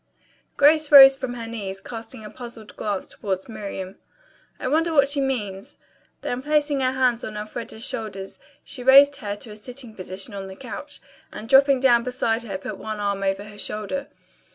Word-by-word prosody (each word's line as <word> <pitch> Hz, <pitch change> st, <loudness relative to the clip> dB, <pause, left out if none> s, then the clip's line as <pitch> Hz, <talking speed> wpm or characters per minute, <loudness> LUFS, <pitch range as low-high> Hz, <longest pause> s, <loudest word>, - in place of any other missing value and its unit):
Grace 305 Hz, +1 st, +4 dB
rose 270 Hz, -1 st, +11 dB
from 260 Hz, -2 st, -5 dB
her 230 Hz, -1 st, -6 dB
knees, 200 Hz, -4 st, -6 dB
casting 225 Hz, +1 st, -9 dB
a -, -, -8 dB
puzzled 235 Hz, -3 st, -10 dB
glance 205 Hz, -3 st, -3 dB
toward 190 Hz, -2 st, -4 dB
Miriam. 200 Hz, -4 st, -7 dB, 0.6 s
"I -, -, -3 dB
wonder 325 Hz, +5 st, +1 dB
what 280 Hz, -3 st, +4 dB
she 285 Hz, 0 st, +1 dB
means." 210 Hz, -8 st, -3 dB, 0.4 s
Then 245 Hz, +1 st, -3 dB
placing 295 Hz, 0 st, +1 dB
her 260 Hz, -1 st, +1 dB
hands 250 Hz, -2 st, +1 dB
on 215 Hz, -1 st, -6 dB
Elfreda's 220 Hz, +1 st, -6 dB
shoulders 195 Hz, -3 st, -5 dB, 0.2 s
she 255 Hz, -, -8 dB
raised 280 Hz, +2 st, +7 dB
her 205 Hz, -1 st, -4 dB
to 210 Hz, +2 st, -9 dB
a -, -, -9 dB
sitting 245 Hz, +2 st, -8 dB
position 190 Hz, +1 st, -6 dB
on 195 Hz, -1 st, -6 dB
the 190 Hz, -, -9 dB
couch 260 Hz, +2 st, -8 dB, 0.3 s
and 220 Hz, -, -8 dB
dropping 270 Hz, 0 st, +5 dB
down 240 Hz, -3 st, +5 dB
beside 235 Hz, -2 st, -1 dB
her 200 Hz, -5 st, -5 dB
put 190 Hz, -, -7 dB
one 215 Hz, -1 st, -5 dB
arm 200 Hz, -1 st, -1 dB
over 195 Hz, 0 st, -1 dB
her 205 Hz, 0 st, -12 dB
shoulder. 215 Hz, +9 st, -4 dB
230 Hz, 180 wpm, -23 LUFS, 205-270 Hz, 0.6 s, rose